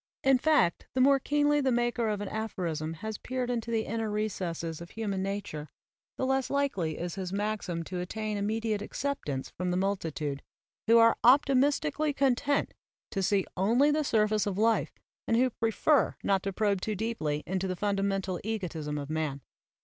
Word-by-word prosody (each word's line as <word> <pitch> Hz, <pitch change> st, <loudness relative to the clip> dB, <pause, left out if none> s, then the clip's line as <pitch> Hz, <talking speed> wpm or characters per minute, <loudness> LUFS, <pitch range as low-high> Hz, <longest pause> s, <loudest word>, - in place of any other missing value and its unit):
In 270 Hz, -1 st, +5 dB
fact, 295 Hz, -, +2 dB
the -, -, +1 dB
more 275 Hz, +1 st, +5 dB
keenly 295 Hz, +1 st, +2 dB
the 265 Hz, -1 st, +2 dB
maker 240 Hz, -1 st, +1 dB
of 205 Hz, -1 st, -2 dB
an 205 Hz, -, -3 dB
aphorism 170 Hz, -8 st, -3 dB
has 220 Hz, -1 st, -4 dB
peered 255 Hz, -1 st, -2 dB
into 235 Hz, -1 st, -2 dB
the 225 Hz, -1 st, 0 dB
inner 225 Hz, 0 st, -2 dB
recesses 180 Hz, -6 st, -3 dB
of 170 Hz, -, -9 dB
human 205 Hz, -4 st, -3 dB
nature, 190 Hz, -6 st, -4 dB, 0.5 s
the 260 Hz, -, 0 dB
less 265 Hz, 0 st, +1 dB
likely 230 Hz, -, 0 dB
is 175 Hz, 0 st, -4 dB
his 190 Hz, -2 st, -4 dB
maxim 200 Hz, -4 st, -2 dB
to 180 Hz, +2 st, -5 dB
attain 215 Hz, +4 st, -3 dB
immediate 215 Hz, +1 st, -1 dB
acceptance 210 Hz, -, -3 dB
from 180 Hz, +1 st, -3 dB
the 180 Hz, -, 0 dB
multitude, 160 Hz, -7 st, -2 dB, 0.5 s
who 230 Hz, +1 st, +7 dB
are 230 Hz, 0 st, +6 dB
optimistically 280 Hz, -, +3 dB
content 275 Hz, +1 st, +1 dB, 0.4 s
to 195 Hz, -, -1 dB
see 195 Hz, 0 st, +2 dB
only 235 Hz, +10 st, +3 dB
the 305 Hz, +1 st, +1 dB
surface 215 Hz, -4 st, +2 dB
of 195 Hz, -2 st, -2 dB
life 225 Hz, +1 st, +2 dB, 0.4 s
and 230 Hz, -, +3 dB
who 255 Hz, +1 st, +3 dB
prefer 230 Hz, +7 st, +2 dB
not 195 Hz, -1 st, +2 dB
to 195 Hz, -, -2 dB
probe 200 Hz, -1 st, 0 dB
too 215 Hz, +1 st, -2 dB
deeply 170 Hz, -9 st, -2 dB
into 190 Hz, +1 st, -1 dB
the 185 Hz, -, -2 dB
fundamental 195 Hz, -2 st, -1 dB
egotism 170 Hz, -9 st, -3 dB
of 140 Hz, -1 st, -4 dB
man. 155 Hz, -3 st, -2 dB
210 Hz, 170 wpm, -29 LUFS, 180-240 Hz, 0.5 s, who